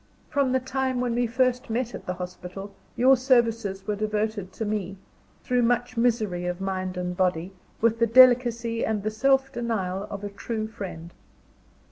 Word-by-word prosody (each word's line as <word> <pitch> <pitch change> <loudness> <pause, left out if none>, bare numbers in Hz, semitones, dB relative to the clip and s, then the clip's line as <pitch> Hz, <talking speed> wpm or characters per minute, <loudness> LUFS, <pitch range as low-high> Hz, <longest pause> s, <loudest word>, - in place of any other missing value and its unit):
From 280 -3 +2
the 260 - +2
time 260 0 -2
when 245 -1 0
we 240 0 +1
first 255 +2 0
met 240 +1 -2
at - - -9
the 180 - -2
hospital, 180 +2 -8 0.2
your 260 +3 +6
services 230 -6 +1
were 210 - -1
devoted 210 -2 -2
to 220 - -4
me, 200 -2 -3 0.5
through 250 -1 +1
much 245 +1 +1
misery 220 -7 0
of 180 0 -3
mind 185 -1 -3
and 180 0 -3
body, 180 0 0 0.3
with 230 0 +2
the 230 - +4
delicacy 235 -1 +5
and 215 -2 -1
the 215 - -1
self 270 +4 +2
denial 205 -6 -2
of 200 0 -6
a 205 - -3
true 215 +2 -4
friend. 180 -6 -8
220 Hz, 170 wpm, -26 LUFS, 195-245 Hz, 0.5 s, your